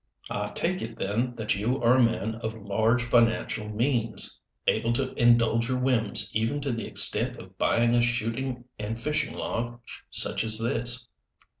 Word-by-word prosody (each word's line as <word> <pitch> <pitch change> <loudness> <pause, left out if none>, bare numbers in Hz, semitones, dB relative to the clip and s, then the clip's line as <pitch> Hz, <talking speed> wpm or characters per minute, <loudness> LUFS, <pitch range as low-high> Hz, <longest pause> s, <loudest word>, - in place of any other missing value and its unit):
"I 105 0 -2
take 185 +2 -1
it, 115 0 -6
then, 120 +5 -2
that 110 -2 -1
you 110 +6 -1
are 115 +1 +4
a - - +5
man 110 -1 0
of 110 -1 -4
large 110 +3 +1
financial 115 -2 +1
means 115 +1 0 0.3
able 115 - +1
to 130 +2 -2
indulge 115 0 +3
your 130 - 0
whims 125 -4 0
even 115 +7 0
to 140 -1 -2
the 115 -1 -4
extent - - +4
of - - -13
buying 120 0 +2
a 120 - +4
shooting 120 +1 -2 0.2
and 110 +2 -4
fishing 150 +5 -2
lodge 120 0 -5
such - - +1
as 110 -1 +3
this?" 120 +1 -2
115 Hz, 165 wpm, -27 LUFS, 110-120 Hz, 0.3 s, a